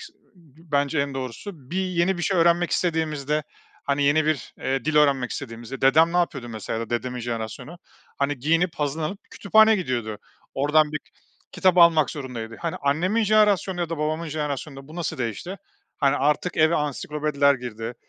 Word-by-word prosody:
is - - -10 0.6
bence 145 +1 +1
en 140 -1 -2
doğrusu; 135 - -7
bir 185 +2 -1
yeni 180 0 0
bir - - -3
şey 190 0 +1
öğrenmek 170 +1 +3
istediğimizde, 155 -3 0 0.4
hani, 140 0 0
yeni 150 +2 +3
bir, 155 -5 -2
eee, 135 +1 -2
dil 155 0 0
öğrenmek 140 -4 +3
istediğimizde 120 0 -7
dedem 160 +5 +5
ne - - 0
yapıyordu 140 -8 -1
mesela 110 0 -4
ya 115 - -4
da - - -22
dedemin 125 +1 -2
jenerasyonu? 120 +7 -5 0.4
Hani, 140 0 0
giyinip 165 +6 +1
hazırlanıp 155 +6 -2
kütüphaneye 220 +2 +4
gidiyordu. 120 - -3 0.4
Oradan 150 +2 +3
bir 150 - -1 0.5
kitap 185 -1 +2
almak 165 -3 +6
zorundaydı. 120 -6 -6
Hani, 170 -1 -3
annemin 175 +11 +1
jenerasyonu 205 -3 +3
ya 170 - -1
da 165 - -3
babamın 155 +2 -2
jenerasyonunda 145 -2 -5
bu 160 - -11
nasıl 170 -6 -3
değişti? 125 - -4 0.4
Hani, 140 -2 +3
artık 150 +5 0
eve 160 +2 +4
ansiklopediler 150 0 +1
girdi. 120 -2 -6
150 Hz, 165 wpm, -24 LUFS, 135-170 Hz, 0.6 s, almak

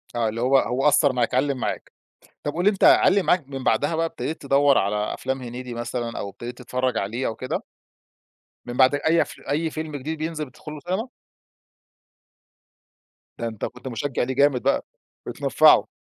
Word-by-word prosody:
آه، 115 -2 +1
اللي 115 +2 -4
هو 135 +2 +4
هو 130 +4 +1
أثَّر 145 -2 +4
معاك، 120 -2 0
علَّم 135 0 +1
معاك. - - -4 0.5
طب 145 - -2
قُل 175 +2 -2
لي، 205 - +6
أنت 200 -2 -2
علَّم 200 -1 +6
معاك 175 -7 +2
من 135 -2 -6
بعدها 155 +3 +1
بقى 165 - +1
ابتدَيت 160 -1 -5
تدوَّر 140 0 +4
على 105 +2 0
أفلام 130 +1 -3
محمد 130 -2 -8
هنيدي 125 0 -7
مثلًا، 120 0 -4
أو 100 - -4
ابتدَيت 120 +4 -8
تتفرَّج 125 -1 -2
عليه 115 +7 -2
أو 110 - -3
كده؟ 130 +2 -4 1.0
من 120 0 -6
بعد 130 +2 +5
أي 160 +3 +2
أف - - -5
أي 160 +3 0
فيلم 155 -1 -5
جديد 155 +4 -4
بينزِل 155 -1 -3
بتدخُل 130 +4 -11
له 150 - -8
سينما؟ 190 - -3 2.3
ده 115 - -3
أنتَ 110 -2 -4
كنت 125 +3 -9
مشجّع 130 +2 -2
لِيه 130 +1 -3
جامد 140 -3 +3
بقى، - - +1 0.4
بتنفَعه. - - +4
130 Hz, 185 wpm, -24 LUFS, 120-150 Hz, 2.3 s, لي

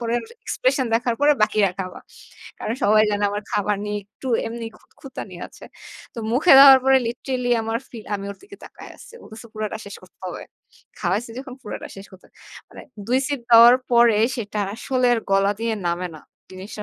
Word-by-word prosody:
পরে 235 -1 -3
ওর - - -8 0.2
এক্সপ্রেশন 410 - 0
দেখার 240 +1 0
পরে 290 +1 +5
বাকিরা 215 -2 +2
খাবা।" 185 -1 -6 0.6
কারণ 225 - -3
সবাই 215 +1 +5
জানে 205 0 -1
আমার 205 +1 -4
খাবার 210 0 0
নিয়ে 210 0 -3
একটু 230 +6 -10 0.2
এমনি 230 +1 -6
খুতখুঁতানি 255 -8 -11
আছে। - - -16 0.5
তো 235 - -8
মুখে 290 +8 +4
দেওয়ার 270 -1 +10
পরে 265 0 +5
লিটারেলি 250 +1 -3
আমার 225 +1 -2
ফিল, 225 -3 -11
আমি 200 -1 -5
ওর - - -9
দিকে 400 0 -14
তাকায় - - -13
আসছি। 465 - -15
ও - - -14
বলছে 220 +2 -11
"পুরাটা 215 0 -4
শেষ 200 - -9
করতে 180 -2 -20
হবে। 180 - -7 0.6
খাওয়াইছি 205 +6 -1
যখন, 265 0 -8
পুরাটা - - -7
শেষ 195 +1 -10
করতে 190 -1 -17
হবে।" - - -33 0.3
মানে - - -12 0.2
২ 255 +2 +2
সিপ 285 -3 -3
দেওয়ার 235 +1 +8 0.2
পরে 235 -3 +5 0.2
সেটা 210 -2 -4
আসলে 255 +1 -1
আর 230 - -2
গলা 195 +1 +3
দিয়ে 230 -1 -1
নামে 175 +1 -1
না। 155 - -11 0.3
জিনিসটা 190 +3 -9
225 Hz, 195 wpm, -22 LUFS, 205-250 Hz, 0.6 s, দেওয়ার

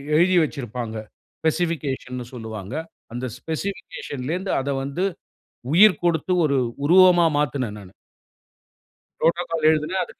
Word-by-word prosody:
எழுதி 180 +3 +4
வச்சிருப்பாங்க. 120 -6 -4 0.4
ஸ்பெசிபிகேஷன்னு 145 -6 -2
சொல்லுவாங்க. 110 -2 -7 0.4
அந்த 120 +2 -4
ஸ்பெசிபிகேஷன்லேந்து 165 0 -4
அத 135 +1 -3
வந்து 140 +7 -3 0.7
உயிர் 195 -1 +6
கொடுத்து 170 +1 +1
ஒரு 140 -2 +1 0.3
உருவமா 180 +1 +6
மாத்துனேன் 130 -7 -1
நானு. 95 -2 -13 1.3
"Protocol" 165 -2 +1
எழுதுனேன். 160 +4 0
150 Hz, 95 wpm, -23 LUFS, 125-175 Hz, 1.3 s, உயிர்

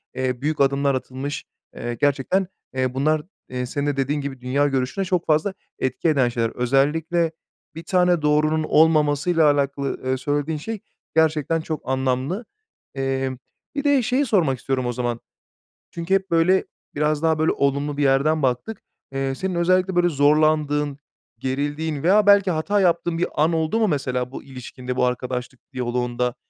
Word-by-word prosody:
eee, 130 -1 -2
büyük 150 0 0
adımlar 140 0 +2
atılmış. 130 +2 -5 0.3
Eee, 120 0 -4
gerçekten, 145 +7 +1 0.3
eee, 130 -1 0
bunlar, 155 +3 +1 0.3
eee, 125 0 -3
senin 145 +3 -3
de 145 - -1
dediğin 140 +2 0
gibi 135 -2 -6
dünya 140 +3 +1
görüşüne 135 +8 -1
çok 180 -1 0
fazla 160 +5 +1 0.3
etki 130 +5 0
eden 135 -5 +3
şeyler. 115 -1 -1
Özellikle 155 +6 +1 0.4
1 165 - -7
tane 180 -1 +2
doğrunun 155 +1 +2
olmamasıyla 155 0 +4
alakalı, 140 -1 -1
eee, 130 0 0
söylediğin 145 +3 -1
şey 220 +8 -5 0.4
gerçekten 160 0 +2
çok 155 -2 -4
anlamlı. 130 - -1 0.5
Emm, 135 -1 -1 0.4
bir 285 - -1
de 285 -2 +4
şeyi 255 +5 +1
sormak 170 - +1
istiyorum 130 +2 -1
o 120 - 0
zaman. 120 -1 -2 0.7
Çünkü 170 +2 -3
hep 195 -2 +1
böyle, 175 +3 +3 0.3
biraz 150 0 +1
daha 160 -1 +2
böyle 155 - +3
olumlu 140 +1 0
bir 145 - +1
yerden 140 +3 +3
baktık. 130 - -1 0.3
Eee, 135 0 -2
senin 185 +3 -3
özellikle 185 +2 +2
böyle 175 0 +4
zorlandığın, 150 -1 +2 0.4
gerildiğin 145 +3 -2
veya 200 +4 +4
belki 200 -2 +6
hata 195 +6 +1
yaptığın 170 -1 +1
bir 175 - +1
an 155 +3 +2
oldu 160 +7 0
mu 220 - +3
mesela 125 -5 -1
bu - - -8
ilişkinde, 125 -1 -7
bu 125 - +2
arkadaşlık 125 0 -3
diyaloğunda? 125 0 -1
145 Hz, 160 wpm, -22 LUFS, 130-165 Hz, 0.7 s, belki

